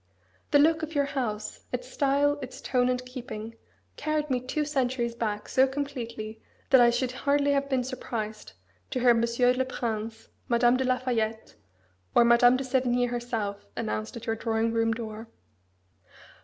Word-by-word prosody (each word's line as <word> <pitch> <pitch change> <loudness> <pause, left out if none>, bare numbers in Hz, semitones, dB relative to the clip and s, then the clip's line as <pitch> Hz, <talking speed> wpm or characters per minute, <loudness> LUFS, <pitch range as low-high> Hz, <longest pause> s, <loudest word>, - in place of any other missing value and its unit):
The - - +5
look 315 +2 +4
of 315 0 -5
your 285 -1 +3
house, 245 -7 -3
its - - -3
style, 285 +1 +1
its 260 -1 -8
tone 250 -1 +1
and 250 0 -1
keeping, 240 -3 -7 0.4
carried 305 -2 -1
me 250 - +2
two 280 +5 -2
centuries 255 -4 0
back 215 -3 -3
so 265 0 +4
completely 235 -6 -5 0.3
that 260 -2 +8
I 240 - +7
should 245 +1 0
hardly 285 +2 +1
have 280 0 +1
been 260 -2 +1
surprised 225 -4 -5 0.4
to - - -2
hear 245 -1 +6
Monsieur 235 +2 +2
le 260 +1 +1
Prince, 225 -3 -4 0.2
Madame 240 0 +4
de 260 +1 0
la 255 0 +2
Fayette, 225 -3 -2 0.6
or 235 - +7
Madame 245 +1 +6
de 270 - -3
Sévigné 250 -1 +1
herself, 225 -4 -3
announced 220 +1 -3
at 235 - -9
your 225 -2 0
drawing 225 0 0
room 225 0 +2
door." 225 -1 -5
245 Hz, 165 wpm, -27 LUFS, 230-265 Hz, 0.6 s, that